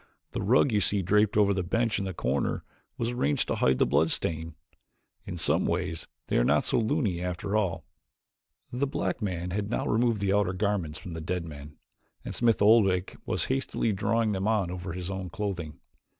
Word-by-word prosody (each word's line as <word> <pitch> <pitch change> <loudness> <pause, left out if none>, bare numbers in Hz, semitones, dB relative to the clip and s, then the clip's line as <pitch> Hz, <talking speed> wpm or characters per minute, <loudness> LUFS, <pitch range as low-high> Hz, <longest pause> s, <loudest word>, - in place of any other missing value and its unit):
The - - -3
rug 120 +6 +4
you 105 -2 +2
see 100 0 +1
draped 105 +3 +3
over 100 -1 +4
the 95 - 0
bench 110 +5 0
in 100 - -2
the 95 - -4
corner 65 0 -1 0.3
was 115 0 -1
arranged 75 - 0
to - - +2
hide 65 0 +3
the - - +4
blood - - +2
stain 80 0 -2 0.7
in - - -5
some - - +2
ways 80 0 -2 0.2
they - - 0
are - - +4
not - - +3
so - - +2
loony 110 - 0
after 90 +3 -3
all." 95 -6 0 0.9
The 130 +3 0
black 135 - -2
man 90 -3 -3
had 100 +2 -2
now 120 - -1
removed 115 -1 +2
the 100 0 +1
outer 100 -2 +2
garments 95 -5 -1
from 90 - -8
the 80 - -5
dead 85 +1 -2
man, 75 -1 -10 0.5
and - - -4
Smith 115 -3 +2
Oldwick 100 -4 +4
was - - 0
hastily 130 -4 0
drawing 110 +3 +1
them 95 0 -1
on 105 -5 +1
over 90 -2 -5
his 90 +1 -5
own 95 -1 -4
clothing. 90 -6 -4
95 Hz, 195 wpm, -28 LUFS, 85-110 Hz, 0.9 s, rug